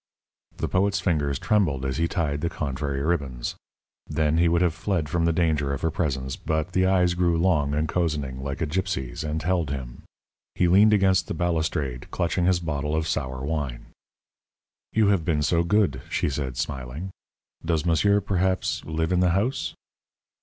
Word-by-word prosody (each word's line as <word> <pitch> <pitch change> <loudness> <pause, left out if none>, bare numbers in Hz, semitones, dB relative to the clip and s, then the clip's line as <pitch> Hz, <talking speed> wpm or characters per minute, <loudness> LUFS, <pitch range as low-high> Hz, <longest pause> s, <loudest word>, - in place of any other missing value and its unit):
The - - -1
poet's 100 +1 +1
fingers 75 -7 0
trembled 75 -9 +1
as 65 0 -2
he 85 +1 +1
tied 75 -5 -1
the 85 - 0
contrary 70 -3 -3
ribbons. 70 -7 -1 0.5
Then 75 +1 +1
he 85 - +4
would 85 +1 +3
have 85 -3 +2
fled 85 -1 -1
from 85 +2 0
the 85 - +3
danger 80 -4 +1
of 70 - -4
her 80 - +1
presence, 65 -6 -2
but 80 +2 -2
the 95 0 +2
eyes 90 -2 +3
grew 85 -1 +2
long 80 -5 +2
and 75 +1 0
cozening, 75 -7 -1
like 70 +2 -4
a - - +2
gypsy's, 80 -7 -2
and 75 0 -3
held 85 -3 +1
him. 65 -4 -6 0.5
He 90 - +3
leaned 100 +5 +6
against 95 -3 +3
the - - -3
balustrade, 80 -7 -1
clutching 85 +1 0
his 90 -1 +3
bottle 75 -2 -2
of 80 0 0
sour 65 -3 -2
wine. 70 -5 -4 1.0
"You 110 -2 +3
have 100 -5 +2
been 75 -3 +1
so 85 +4 +2
good," 85 - +2
she - - 0
said, 65 -3 -3
smiling. 70 +8 -4 0.5
"Does 80 -1 0
monsieur, 100 +5 +3
perhaps, 95 -1 0
live 80 +1 -1
in 90 - +3
the 90 -1 +4
house?" 120 +7 -1
80 Hz, 175 wpm, -25 LUFS, 70-90 Hz, 1.0 s, leaned